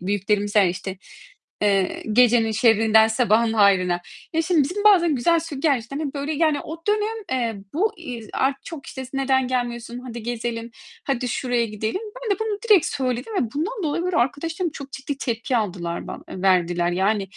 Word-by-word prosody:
büyüklerimiz 205 +2 0
der, 205 -3 +6
işte, 185 +1 -5 0.6
eee, 195 -2 +1
"Gecenin 230 -1 +4
şerrinden 220 0 +5
sabahın 225 -1 +2
hayrına." 190 -5 +3 0.3
Ya, 325 0 +1
şimdi 330 -2 +3
bizim 400 +8 -3
bazen 345 -7 +6
güzel 330 +7 +2
sö 320 -3 -6
gerçekten, 275 -3 0
hani, 300 -2 -3
böyle, 285 +2 -2
yani, 310 -1 +2
o 320 - -7
dönem, 425 +1 +1 0.2
eee, 230 -6 -1
bu, 420 +8 +1
iii, 250 -9 -7
z - - -14
ar 265 +1 +1
çok, 320 -5 -8
işte, 265 - -7
s 255 - -13
"Neden 265 -1 +2
gelmiyorsun? 240 -1 -3
Haydi 240 -2 -8
gezelim. 235 0 -4 0.3
Haydi 255 -2 -1
şuraya 245 -1 0
gidelim." 220 - -3 0.2
Ben 420 -5 0
de - - -21
bunu 435 -2 -1
direkt 400 -7 +6
söyledim 255 - -2
ve 235 -3 -2
bundan 395 +10 -2
dolayı, 315 +1 -1
böyle, 360 -1 -1
arkadaşlarım 325 +7 -1
çok 280 -3 -9
ciddi 270 +1 -5
tepki 235 -1 -1
aldılar 180 -6 -3
ban - - -8
verdiler. 175 -2 +2
Yani, 195 +3 +1
245 Hz, 180 wpm, -23 LUFS, 215-305 Hz, 0.6 s, der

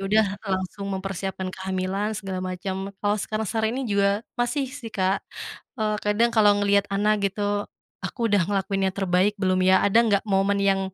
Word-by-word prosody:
udah 215 +2 +4 0.3
langsung 190 +1 -3
mempersiapkan 190 0 -4
kehamilan 190 +3 -2
segala 195 -3 -4
macem. 190 +1 -4
Kalau 205 0 +1
sekarang-sekarang 220 +1 -1
ini 270 - -2
juga 200 +2 +2 0.2
masih 270 +4 0
sih, 270 -5 -7
Kak, 195 -2 0 0.6
eee, 215 -1 0
kadang 210 +3 +3
kalau 215 -2 +5
ngelihat 200 0 +3
anak 205 +2 +2
gitu, 205 +1 -2 0.4
"Aku 235 -2 -2
udah 205 - +5
ngelakuin 195 -1 0
yang 190 - -7
terbaik 190 +1 +2
belum 185 -2 +1
ya? 185 0 +4
Ada 205 +3 +4
nggak 200 -2 +2
momen 200 -1 +2
yang 195 -1 +3
200 Hz, 165 wpm, -25 LUFS, 190-210 Hz, 0.6 s, kalau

